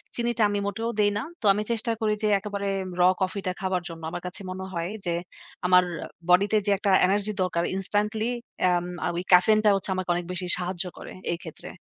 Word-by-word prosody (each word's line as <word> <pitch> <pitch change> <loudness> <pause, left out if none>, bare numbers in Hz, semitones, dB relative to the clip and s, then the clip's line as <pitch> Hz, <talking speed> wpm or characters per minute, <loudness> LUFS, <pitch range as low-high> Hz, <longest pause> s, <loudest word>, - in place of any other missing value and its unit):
চিনিটা 235 -1 +2
আমি 205 0 0
মোটেও 225 +4 -2
দেই 205 0 +4
না। 210 - -2 0.2
তো - - -5
আমি 210 +2 -1
চেষ্টা 230 0 0
করি 215 -1 +2
যে - - +3
একেবারে 200 0 -4 0.3
raw 180 +1 +7
কফিটা 190 0 -1
খাওয়ার 185 -3 -1
জন্য। 165 -1 -9
আমার 175 0 -5
কাছে 180 - -6
মনে 190 +1 -5
হয় 170 0 -2 0.2
যে, 175 - 0 0.6
আমার 180 0 +6 0.5
বডিতে 200 +4 +5
যে, 205 - +2
একটা 200 0 +1
এনার্জি 200 +2 +1
দরকার 170 -2 0
ইনস্ট্যান্টলি 210 +4 0 0.4
এম 175 -1 +1 0.2
ঐ - - +1 0.2
ক্যাফেইনটা 215 +4 +6
হচ্ছে 195 - -3
আমাকে 185 -1 -3
অনেক 175 0 -3
বেশি 180 0 -3
সাহায্য 180 0 -3
করে - - -9 0.2
এই - - -3
ক্ষেত্রে। 160 - -9
195 Hz, 195 wpm, -26 LUFS, 180-210 Hz, 0.6 s, raw